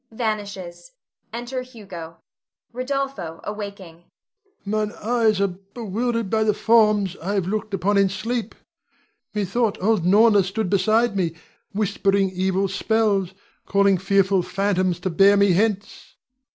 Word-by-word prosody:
[Vanishes. 210 - -5 0.4
Enter 240 +2 -4
Hugo. 190 -10 -10 0.6
Rod. 255 +2 -5
[awaking]. 200 - -5 0.6
Mine 210 +1 -1
eyes 225 -2 +1
are 200 - +3
bewildered 220 +4 -3
by 220 +3 +1
the 210 -1 +1
forms 210 -5 +3
I 195 +5 -3
have 195 -3 0
looked 215 +3 -3
upon 200 +2 +1
in 195 -1 +3
sleep. 225 +4 -3 0.8
Methought 210 +2 0
old 210 -2 +1
Norna 205 +3 +5
stood 195 +1 -3
beside 215 +3 +2
me, 170 -4 -1 0.4
whispering 200 -1 +1
evil 190 +1 0
spells, 195 -2 0 0.3
calling 200 -1 +3
fearful 195 0 +2
phantoms 185 -2 0
to 185 - -2
bear 200 +4 +5
me 200 -1 +4
hence. 205 +2 -1
200 Hz, 125 wpm, -22 LUFS, 190-220 Hz, 0.8 s, Norna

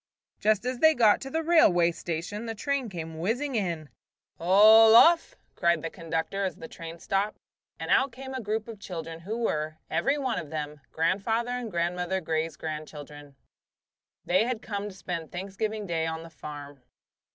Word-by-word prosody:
Just 215 +1 +2
as 250 -1 -2
they 315 0 +6
got 220 -4 +4
to 270 - -6
the 320 +4 -1
railway 180 - +5
station 175 +7 -5
the 225 - -4
train 275 +1 -2
came 160 -3 -7
whizzing 245 - -1
in. 170 -9 -2 0.5
"All 215 +5 +7
off!" 330 +7 +6 0.2
cried 170 -3 +2
the 165 - -4
conductor, 165 +3 -3
as 190 - -2
the 160 - -9
train 165 0 -9
stopped; 195 +4 -1 0.4
and - - -4
out 270 0 +4
came 265 +2 -8
a 260 - -3
group 215 +1 -2
of 225 -3 -9
children 165 -4 -6
who 205 +7 -5
were, 155 -9 -2
every 275 +2 +1
one 260 -5 -1
of 155 - -8
them, 150 -1 -5
Grandfather 215 +9 0
and 245 -2 -3
Grandmother 180 +1 -1
Grey's 160 -2 -2
grandchildren. 150 -2 -8 0.9
They 185 +5 +3
had 245 -2 -3
come 205 -1 -4
to 190 - -12
spend 170 -4 -5
Thanksgiving 200 +4 -4
Day 165 -3 -1
on 160 0 -4
the 165 - -12
farm. 145 -3 -9
190 Hz, 175 wpm, -27 LUFS, 165-225 Hz, 0.9 s, All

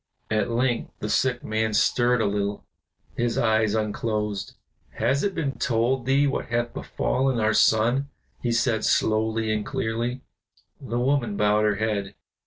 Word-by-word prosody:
At 110 +1 +1
length 120 0 0
the 105 - -5
sick 125 -2 +1
man 110 0 -1
stirred 120 +1 +3
a - - +1
little, 100 0 -2 0.5
his 120 -1 -1
eyes 110 -2 +2
unclosed. 105 -2 -2 0.4
"Has 140 +1 0
it 200 -2 -1
been 140 -3 -2
told 120 +1 0
thee 140 +2 +4
what 135 - -1
hath 120 0 -1
befallen 130 -2 -1
our 110 0 +2
son?" 120 +7 +3 0.3
he 120 - -1
said, 115 -1 +1
slowly 110 0 +1
and 105 -1 -1
clearly. 115 +4 -2 0.6
The 120 -3 -4
woman 125 -5 0
bowed 105 +1 +3
her 105 -1 +2
head. 105 -2 -2
115 Hz, 150 wpm, -25 LUFS, 110-125 Hz, 0.6 s, thee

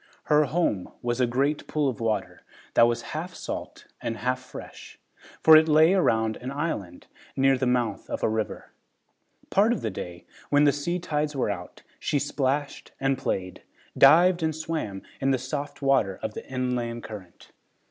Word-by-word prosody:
Her 150 0 +4
home 140 - -1
was 120 +1 -1
a 125 - +3
great 140 +5 0
pool 150 -2 0
of 125 -5 -2
water 115 -2 -2 0.3
that 115 - +6
was 120 0 -1
half 175 +4 -5
salt - - -6 0.2
and 115 - -3
half 125 +2 -1
fresh, 130 - -11 0.5
for 160 - +9
it 155 +1 +7
lay 160 +3 +5
around 110 - +2
an 125 - -6
island 125 - -4 0.3
near 135 0 +4
the 130 0 -1
mouth 125 -2 -1
of - - -4
a - - +4
river. 110 -1 -3 0.8
Part 205 +4 +4
of 240 - -1
the 110 - -2
day, 90 -2 -8 0.2
when 145 0 +4
the 145 - +6
sea 170 +5 -2
tides 150 -3 -2
were 125 -6 0
out, 90 -3 -8 0.2
she - - 0
splashed 140 +1 -2
and 135 0 +1
played, 95 -8 -3 0.3
dived 170 +6 +6
and 160 -1 0
swam 155 -12 -4 0.2
in 135 - +1
the 135 - +3
soft 145 +3 -5
water 130 -9 +2
of 110 - -3
the - - -8
inland 125 -2 -2
current. 100 -5 -11
135 Hz, 175 wpm, -26 LUFS, 115-150 Hz, 0.8 s, for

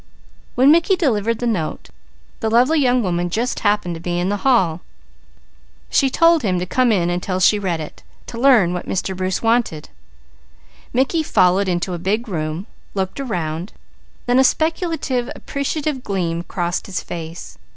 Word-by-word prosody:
When 265 +3 +6
Mickey 340 +4 +4
delivered 230 - 0
the 245 - -4
letter 185 -10 -3 0.5
the 220 - -1
lovely 255 +8 +3
young 250 -3 +2
woman 175 -2 -1
just 235 +7 -1
happened 205 -4 +1
to 165 - -8
be 175 0 -2
in 180 +2 0
the 205 - 0
hall. 190 -9 +2 1.1
She 275 - +3
told 330 +3 +4
him 190 -6 0
to 180 - -2
come 250 +6 +2
in 175 -4 +1
until 185 +1 -2
she 205 +3 +4
read 180 -5 -2
it, 155 - -8 0.2
to 230 - -8
learn 235 -10 +5
what 180 - -5
Mr. 190 0 -2
Bruce 185 +2 -2
wanted. 225 -9 0 1.0
Mickey 270 +6 +1
followed 190 - +2
into 180 0 -1
a 175 - -4
big 210 +7 -1
room, 160 -1 -3 0.3
looked 190 +5 -2
around, 175 - -3 0.5
then 245 +1 +3
a - - +6
speculative, 315 -5 0
appreciative 280 -1 -3
gleam 170 -5 -2
crossed 175 0 -3
his 195 - -4
face. 165 0 -8
205 Hz, 160 wpm, -20 LUFS, 175-255 Hz, 1.1 s, When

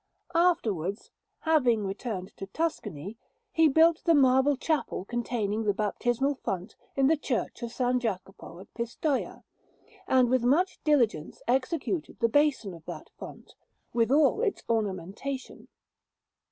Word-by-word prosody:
Afterwards, 225 - +1 0.3
having 250 -10 +3
returned 195 -1 -5
to 195 - -6
Tuscany, 210 - -4 0.3
he 325 -1 +5
built 320 +3 +4
the 335 -2 +4
marble 265 0 +4
chapel 305 - -1
containing 225 -2 -2
the 205 -2 +1
baptismal 240 +6 0
font 185 +2 -4 0.2
in 275 - +3
the 315 +4 +5
Church 260 -4 -3
of 235 - -3
S. 250 0 +2
Jacopo 195 -5 -5
at 195 - -14
Pistoia, 240 +5 -2 0.6
and 255 -1 +4
with 255 +1 +2
much 320 +10 +2
diligence 240 - +1
executed 270 +7 -1
the 230 -1 +2
basin 285 -7 +2
of 165 -2 -12
that - - -8
font, - - -10 0.4
with 230 -1 +2
all 300 +8 +4
its 440 -4 -1
ornamentation. 215 +4 -3
245 Hz, 130 wpm, -28 LUFS, 210-290 Hz, 0.6 s, he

